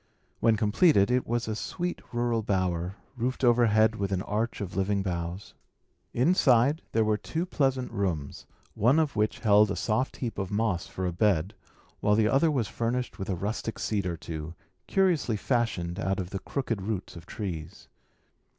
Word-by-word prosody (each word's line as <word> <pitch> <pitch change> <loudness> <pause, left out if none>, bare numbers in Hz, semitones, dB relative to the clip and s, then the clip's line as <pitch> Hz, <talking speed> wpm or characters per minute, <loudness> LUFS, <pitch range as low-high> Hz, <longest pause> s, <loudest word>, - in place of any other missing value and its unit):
When 115 -1 +3
completed, 105 - +4
it 125 0 +1
was 120 0 -1
a 110 - -2
sweet 175 - -4
rural 120 -1 0
bower, 95 -3 -1 0.2
roofed 125 +2 -2
overhead 110 -2 +4
with 100 -1 -2
an 95 -1 0
arch 110 +3 -2
of 95 -4 -5
living 100 +1 0
boughs. 85 +1 -4 0.6
Inside 135 0 +3
there 110 - +2
were 105 0 +2
two 165 +2 -3
pleasant 135 -7 0
rooms, 90 -10 -3 0.3
one 125 +8 +3
of 155 -3 +1
which 105 +1 0
had 105 -2 +5
a 100 - -1
soft 120 +4 -1
heap 120 -4 -4
of 95 -2 -2
moss 100 -4 0
for 95 - -4
a 90 - -1
bed, 95 0 +1 0.5
while 105 - +3
the 110 0 +3
other 135 +8 +3
was 130 -8 0
furnished 120 +3 -2
with 95 - -4
a 95 - 0
rustic 105 +5 -3
seat 100 -4 -1
or 85 -1 -3
two, 80 0 -6 0.3
curiously 175 - +2
fashioned 100 -8 -1
out 95 0 -1
of 90 0 -4
the 95 - -3
crooked 115 -5 -3
roots 95 -2 -4
of 85 0 -11
trees. 85 -7 -6
105 Hz, 175 wpm, -28 LUFS, 95-120 Hz, 0.6 s, had